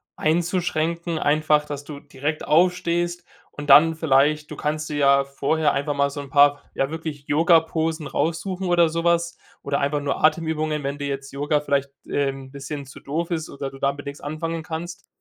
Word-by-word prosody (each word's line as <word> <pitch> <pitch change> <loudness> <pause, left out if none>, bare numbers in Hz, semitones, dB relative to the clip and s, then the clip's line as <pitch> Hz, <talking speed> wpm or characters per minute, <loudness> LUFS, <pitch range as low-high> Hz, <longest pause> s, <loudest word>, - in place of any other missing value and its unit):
einzuschränken, 170 0 0
einfach, 150 0 +2
dass 145 -1 -6
du 145 -1 -9
direkt 145 +1 -4
aufstehst 175 +1 +1 0.3
und 145 0 -8
dann 160 +3 +7
vielleicht 150 0 +2
du 150 - -5
kannst 155 +1 -2
dir 150 - -3
ja 140 -1 +4
vorher 145 +2 0
einfach 145 +1 -1
mal 140 0 +2
so 145 - -6
'n 140 - -10
paar, 145 0 +5
ja, 135 +2 0
wirklich 155 -3 -6
Yoga-Posen 160 0 +2
raussuchen 175 +6 -2
oder 175 -2 +4
sowas 170 +1 0 0.3
oder 140 0 -1
einfach 145 +1 0
nur 145 +1 -2
Atemübungen, 155 -1 +1
wenn 140 +1 -3
dir 145 - -3
jetzt 135 0 -5
Yoga 145 +2 0
vielleicht, 140 -1 0 0.2
ähm, 135 -1 -1
'n - - -17
bisschen 140 +1 -6
zu 135 - -12
doof 165 +5 -3
ist 160 -2 -2
oder 140 -1 -6
du 135 - -12
da 140 - +2
mit 145 0 -10
nix 140 0 -7
anfangen 160 +2 -4
kannst. 170 +2 -7
150 Hz, 185 wpm, -23 LUFS, 140-165 Hz, 0.3 s, dann